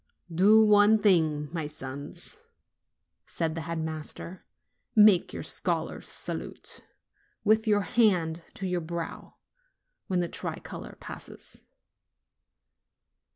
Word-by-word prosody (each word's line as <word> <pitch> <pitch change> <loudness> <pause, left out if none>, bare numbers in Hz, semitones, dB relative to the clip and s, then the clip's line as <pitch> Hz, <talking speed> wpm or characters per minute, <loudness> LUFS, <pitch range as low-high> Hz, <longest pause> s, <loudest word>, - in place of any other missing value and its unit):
"Do 210 +6 +6
one 210 +1 +6
thing, 160 -8 +2
my 160 -3 -2
sons," 145 -1 -8 0.9
said 160 -1 -2
the 165 - -4
head 165 +1 -4
master; 160 +3 -5 0.5
"make 210 -4 +6
your - - -6
scholar's - - -1
salute, - - -6 0.6
with 220 +1 +3
your 205 -1 +3
hand 185 -8 +2
to 195 - -5
your 180 -1 -1
brow, 170 0 -6 0.7
when 185 -2 0
the 175 - 0
tricolor - - -5
passes." - - -10
175 Hz, 105 wpm, -28 LUFS, 160-205 Hz, 0.9 s, Do